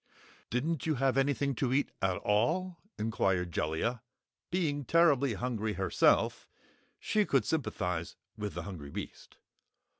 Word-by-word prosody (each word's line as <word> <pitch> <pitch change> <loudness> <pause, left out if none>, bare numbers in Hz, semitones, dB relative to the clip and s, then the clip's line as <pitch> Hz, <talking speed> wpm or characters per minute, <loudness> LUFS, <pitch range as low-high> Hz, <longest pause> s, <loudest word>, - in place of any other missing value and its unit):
"Didn't 150 +7 -1
you 155 - +2
have 135 -1 +1
anything 140 0 +1
to 130 -3 0
eat, 140 +2 +1
at 95 -1 +1
all?" 165 - +1 0.2
inquired 95 -5 0
Jellia. 80 +11 -1 0.5
Being 155 -5 0
terribly 140 -6 +4
hungry 110 -2 -2
herself, 95 -1 +2 0.5
she 210 0 +1
could 135 -9 +2
sympathize 90 - -2 0.2
with 105 -2 -5
the - - -4
hungry 85 -8 -7
beast. - - -8
125 Hz, 125 wpm, -31 LUFS, 100-145 Hz, 0.5 s, terribly